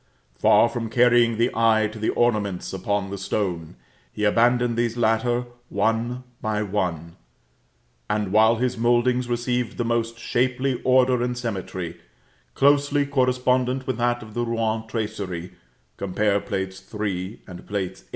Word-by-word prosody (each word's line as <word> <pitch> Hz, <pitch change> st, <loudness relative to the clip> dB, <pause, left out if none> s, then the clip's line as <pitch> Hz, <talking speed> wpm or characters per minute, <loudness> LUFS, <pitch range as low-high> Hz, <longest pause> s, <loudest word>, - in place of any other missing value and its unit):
Far 90 Hz, -, +4 dB
from 115 Hz, -1 st, -4 dB
carrying 120 Hz, -1 st, +4 dB
the 120 Hz, +2 st, +2 dB
eye 110 Hz, -1 st, +3 dB
to 110 Hz, -, -9 dB
the 110 Hz, -, 0 dB
ornaments, 105 Hz, -7 st, 0 dB
upon 100 Hz, +1 st, -2 dB
the 100 Hz, -, -5 dB
stone, 90 Hz, -5 st, -3 dB, 0.4 s
he 105 Hz, -, -5 dB
abandoned 120 Hz, +3 st, +3 dB
these 120 Hz, 0 st, -1 dB
latter 120 Hz, +2 st, +1 dB, 0.2 s
one 120 Hz, +3 st, 0 dB, 0.2 s
by 110 Hz, -2 st, -1 dB
one; 90 Hz, -5 st, -3 dB, 0.9 s
and 105 Hz, -2 st, -1 dB
while 110 Hz, +2 st, +5 dB
his 125 Hz, 0 st, -1 dB
mouldings 120 Hz, +1 st, +2 dB
received 120 Hz, 0 st, -1 dB
the 120 Hz, -, -1 dB
most 115 Hz, 0 st, -1 dB
shapely 125 Hz, +2 st, 0 dB
order 130 Hz, -1 st, +4 dB
and 125 Hz, 0 st, -1 dB
symmetry, 95 Hz, -7 st, -4 dB, 0.6 s
closely 145 Hz, +1 st, +3 dB
correspondent 130 Hz, -1 st, +1 dB
with 130 Hz, -, -2 dB
that 120 Hz, 0 st, 0 dB
of 110 Hz, -1 st, -12 dB
the 120 Hz, -, -1 dB
Rouen 115 Hz, -1 st, -1 dB
tracery, 100 Hz, -6 st, -4 dB, 0.5 s
compare 100 Hz, +1 st, +1 dB
Plates 95 Hz, 0 st, -4 dB
III. 105 Hz, -1 st, -3 dB
and 90 Hz, -2 st, -10 dB
VIII. 95 Hz, -2 st, -3 dB
115 Hz, 140 wpm, -24 LUFS, 105-120 Hz, 0.9 s, while